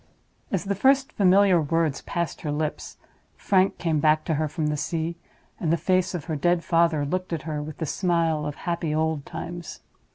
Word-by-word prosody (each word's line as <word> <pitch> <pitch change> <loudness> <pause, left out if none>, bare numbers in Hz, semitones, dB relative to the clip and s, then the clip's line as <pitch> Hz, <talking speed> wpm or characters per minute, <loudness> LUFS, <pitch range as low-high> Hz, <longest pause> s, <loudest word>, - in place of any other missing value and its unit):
As 195 - 0
the 200 0 -1
first 270 +6 +3
familiar 190 -2 +4
words 160 -1 0
passed 170 -1 -3
her 150 - -3
lips, 150 +1 -3 0.4
Frank 190 -1 +2
came 160 -3 0
back 155 +1 +3
to 160 - 0
her 155 +1 0
from 155 +1 -3
the 150 0 0
sea, 160 +2 -2 0.4
and 160 - 0
the 170 - +3
face 185 +1 +1
of 165 - -4
her 160 - -2
dead 175 +3 +1
father 165 -3 +2
looked 185 +5 -3
at 165 - -3
her 155 -2 -3
with 150 0 -7
the 160 - -2
smile 165 -2 0
of 145 - -4
happy 170 -3 -1
old 160 -2 -1
times. 175 -1 -7
165 Hz, 195 wpm, -25 LUFS, 155-180 Hz, 0.4 s, familiar